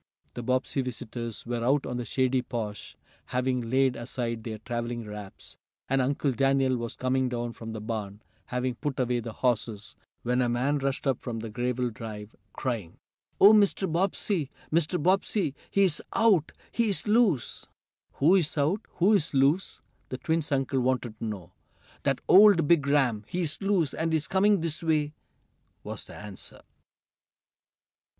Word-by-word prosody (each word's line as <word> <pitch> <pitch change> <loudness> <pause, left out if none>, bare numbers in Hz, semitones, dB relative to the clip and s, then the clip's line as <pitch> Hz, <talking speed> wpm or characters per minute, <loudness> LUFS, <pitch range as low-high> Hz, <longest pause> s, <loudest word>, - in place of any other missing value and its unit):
The 120 - -5
Bobbsey 130 +3 0
visitors 115 -2 -5
were 120 -1 -2
out 135 +3 +2
on 125 - -3
the 120 - -3
shady 130 0 +1
porch, 110 -4 -6 0.3
having 125 0 0
laid 130 0 +3
aside 120 -1 -4
their 110 -1 -5
traveling 120 +1 -4
wraps, 105 -2 -10 0.3
and 135 0 +2
Uncle 140 +2 0
Daniel 135 +1 +2
was 115 -1 -4
coming 130 0 0
down 120 -1 -3
from 115 -1 -8
the 110 - -5
barn, 105 -2 -5 0.2
having 125 0 -1
put 135 +1 -4
away 125 -1 +1
the 115 0 -6
horses, 110 -3 -2 0.3
when 125 +1 +1
a 120 - +1
man 130 +5 +1
rushed 135 +1 -2
up 135 -3 +1
the 115 -3 -5
gravel 125 +1 -1
drive, 105 -1 -8 0.2
crying: 115 -10 -4 0.4
"Oh, 205 +2 +9
Mr. 200 -2 +3
Bobbsey! 175 -2 0 0.2
Mr. 165 +2 +2
Bobbsey! 185 -1 +1 0.2
He's 190 -6 +2
out! 200 -9 +3 0.2
He's 220 -5 0
loose!" 210 - +2 0.5
"Who's 165 +1 +3
out? 155 +9 +1
Who's 180 -5 +3
loose?" 140 +8 +2 0.3
the 130 - -4
twins' 160 +1 -1
uncle 135 -1 +1
wanted 125 -3 -1
to - - -4
know. 95 -5 -6 0.5
"That - - 0
old 195 -5 +7
big 150 -4 +4
ram! 130 -7 +2
He's 170 -2 -2
loose, 195 -7 +1
and 165 0 -1
he's 160 -1 +1
coming 200 0 +3
this 160 -2 -2
way!" 155 -2 +1 0.7
was - - -6
the - - -11
answer. 100 -2 -8
130 Hz, 150 wpm, -28 LUFS, 120-160 Hz, 0.7 s, Oh